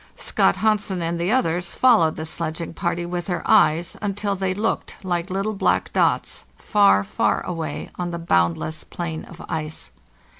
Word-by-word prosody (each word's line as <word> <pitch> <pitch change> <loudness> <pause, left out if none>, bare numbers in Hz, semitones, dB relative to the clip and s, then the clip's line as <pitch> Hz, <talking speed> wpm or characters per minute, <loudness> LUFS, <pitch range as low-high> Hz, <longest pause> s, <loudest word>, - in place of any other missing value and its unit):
Scott - - +2
Hansen 210 -4 +1
and 170 +1 -2
the 175 +4 +1
others 175 -8 +1
followed 220 -11 +4
the 155 - -5
sledging 165 0 -4
party 170 +1 -2
with 175 0 -3
their 175 -3 -2
eyes 165 +3 +4
until 205 0 -1
they 190 -1 -1
looked 215 +3 -2
like 175 -1 -1
little 195 +3 -1
black 195 - +1
dots - - +1
far, 200 - +4
far - - 0
away 165 -4 -4
on 175 -1 -1
the 170 - -4
boundless 85 - 0
plain 160 -2 -5
of 170 +1 -11
ice. 155 - -5
175 Hz, 160 wpm, -23 LUFS, 160-195 Hz, -, followed